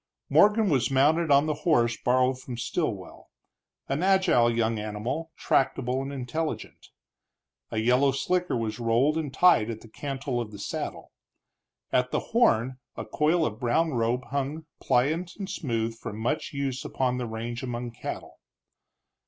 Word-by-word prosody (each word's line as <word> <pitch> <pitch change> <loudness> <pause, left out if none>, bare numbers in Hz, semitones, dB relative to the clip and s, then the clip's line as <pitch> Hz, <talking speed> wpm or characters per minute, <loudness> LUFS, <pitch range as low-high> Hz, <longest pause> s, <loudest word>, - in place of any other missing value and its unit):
Morgan 210 +1 +5
was 135 -8 +2
mounted 150 +5 +3
on 140 +1 +5
the 155 - 0
horse 120 -8 +3
borrowed 130 +1 +1
from 125 -2 -7
Stilwell, 115 - -4 0.6
an 140 +4 -1
agile 185 -11 +4
young 115 -1 0
animal, 110 +10 -4
tractable 130 -1 +1
and 135 +1 -5
intelligent. 140 +4 -4 0.8
A - - -5
yellow 125 +5 +3
slicker 175 +5 0
was 115 0 -3
rolled 120 +6 +2
and 155 -4 -2
tied 160 -8 +4
at 110 -1 -5
the - - -13
cantle 135 +1 -3
of 115 - -5
the 105 - -10
saddle; 100 - -5 0.8
at 125 0 +2
the - - 0
horn 130 - +3 0.2
a - - -4
coil 160 +2 +2
of 110 -3 -4
brown 130 +7 +1
rope 120 +2 0
hung, 140 +3 -2
pliant 155 +8 +1
and 195 -2 -5
smooth 115 - -2
from 105 -2 -7
much 120 +7 -2
use 135 -2 -3
upon 125 -1 -1
the 125 - -3
range 115 +2 -5
among 120 -1 -4
cattle. 115 - -7
130 Hz, 155 wpm, -27 LUFS, 120-155 Hz, 0.8 s, Morgan